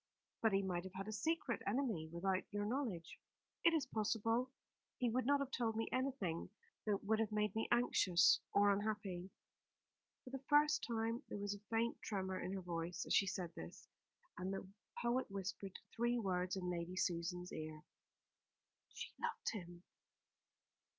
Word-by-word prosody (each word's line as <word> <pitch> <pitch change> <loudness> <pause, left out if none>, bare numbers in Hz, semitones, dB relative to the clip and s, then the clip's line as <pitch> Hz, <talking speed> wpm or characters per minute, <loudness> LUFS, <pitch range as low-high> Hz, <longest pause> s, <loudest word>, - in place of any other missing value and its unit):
"But 225 -3 +4
he 195 0 +3
might 180 -2 -1
have 190 0 -8
had 195 +2 -4
a - - -2
secret 255 +1 0
enemy 210 - 0
without 185 +2 0
your 205 0 -1
knowledge?" 215 - -2 0.4
"It 335 - +7
is 320 -4 +2
possible. 225 +3 +1 0.5
He 245 -2 +2
would 255 +1 +1
not 285 0 +5
have 275 -1 -2
told 230 -3 0
me 225 - 0
anything 255 -12 -1 0.4
that 205 -2 +1
would 220 +2 +2
have 220 -1 +1
made 210 -1 +1
me 220 - 0
anxious 220 -7 +5
or 205 0 +6
unhappy." 200 -3 -1 0.9
For 255 - -10
the 270 0 -5
first 295 +1 +5
time 230 0 0
there - - -3
was 205 0 -1
a 205 - -8
faint 230 +1 +1
tremor 190 -3 -2
in 185 - -3
her 195 - -2
voice 170 0 -2
as - - 0
she 195 - +5
said 180 -2 -2
this; 80 +1 -9 0.5
and 185 +1 -1
the 195 -1 -4 0.4
poet 240 +1 +1
whispered 195 0 -4 0.2
three 240 +1 +2
words 185 -4 0
in 180 -2 -1
Lady 175 +1 -3
Susan's 180 0 -1
ear 155 -1 -5 1.1
"She - - -5
loved - - -1
him!" 175 -4 -7
205 Hz, 165 wpm, -40 LUFS, 180-235 Hz, 1.1 s, It